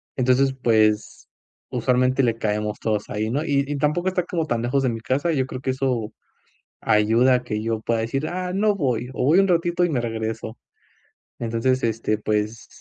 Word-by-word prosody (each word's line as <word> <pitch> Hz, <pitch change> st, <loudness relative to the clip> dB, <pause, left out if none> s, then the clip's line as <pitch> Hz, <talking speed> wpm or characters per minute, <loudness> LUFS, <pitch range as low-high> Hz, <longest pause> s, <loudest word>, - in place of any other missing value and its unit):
Entonces, 130 Hz, +1 st, +2 dB
pues, 110 Hz, -4 st, +1 dB, 0.4 s
usualmente 130 Hz, +1 st, +1 dB
le 115 Hz, -2 st, +1 dB
caemos 105 Hz, -1 st, -2 dB
todos 105 Hz, -2 st, -2 dB
ahí, 110 Hz, +1 st, -2 dB
¿no? 145 Hz, +6 st, -1 dB
Y 140 Hz, -3 st, +1 dB
y 145 Hz, 0 st, -2 dB
tampoco 150 Hz, +6 st, 0 dB
está 185 Hz, -1 st, +1 dB
como 170 Hz, -2 st, -2 dB
tan 120 Hz, -6 st, -1 dB
lejos 135 Hz, +3 st, 0 dB
de 130 Hz, -, +2 dB
mi 115 Hz, -1 st, -4 dB
casa, 145 Hz, +8 st, 0 dB
yo 130 Hz, -3 st, +1 dB
creo 130 Hz, -, -6 dB
que 130 Hz, -, -1 dB
eso 125 Hz, -5 st, -2 dB, 0.7 s
ayuda 115 Hz, +5 st, +3 dB
a 125 Hz, -, 0 dB
que 105 Hz, -3 st, -3 dB
yo 115 Hz, -1 st, -1 dB
pueda 115 Hz, 0 st, 0 dB
decir: 135 Hz, +6 st, -2 dB
"Ah 180 Hz, 0 st, -3 dB
no 205 Hz, +2 st, +2 dB
voy, 125 Hz, -, -1 dB
o 125 Hz, -, -2 dB
voy 155 Hz, +7 st, +5 dB
un 195 Hz, -, +5 dB
ratito 175 Hz, 0 st, +2 dB
y 175 Hz, -, +1 dB
me 130 Hz, -, 0 dB
regreso". 110 Hz, 0 st, -4 dB, 0.8 s
Entonces, 120 Hz, +3 st, 0 dB
este, 110 Hz, -2 st, 0 dB
pues 105 Hz, +1 st, -2 dB
125 Hz, 190 wpm, -23 LUFS, 110-140 Hz, 0.8 s, voy